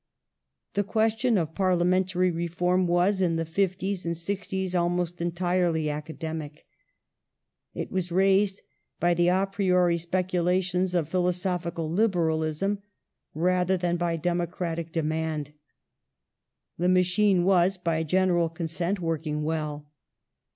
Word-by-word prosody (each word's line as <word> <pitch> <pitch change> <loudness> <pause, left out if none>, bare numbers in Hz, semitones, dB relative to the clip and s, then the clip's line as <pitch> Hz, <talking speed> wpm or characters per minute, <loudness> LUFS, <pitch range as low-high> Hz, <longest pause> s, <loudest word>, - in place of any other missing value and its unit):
The 205 - +1
question 220 +2 +1
of 160 -3 -1
parliamentary 185 0 +2
reform 175 +2 0
was, 180 +3 +2
in 170 -3 +2
the 165 0 -1
'fifties 190 +2 -1
and 170 -1 -2
'sixties, 190 +1 -3
almost 175 0 0
entirely 175 -2 0
academic. 155 0 -6 1.1
It - - -5
was 185 -2 -2
raised 195 +2 +3 0.4
by 175 0 +3
the 175 0 +2
a 185 +2 +3
priori 180 -3 +2
speculations 180 +1 0
of 165 -4 +1
philosophical 180 -1 -1
liberalism, 170 0 0 0.6
rather 180 +3 +2
than 175 -1 0
by 170 -1 -1
democratic 170 -1 -2
demand. 155 -2 -2 1.3
The 180 +1 +2
machine 185 +1 +3
was, 185 0 +3
by 165 -3 -1
general 175 0 +2
consent, 170 +3 -3
working 155 -3 -2
well. 150 -2 -3
175 Hz, 110 wpm, -26 LUFS, 165-185 Hz, 1.3 s, raised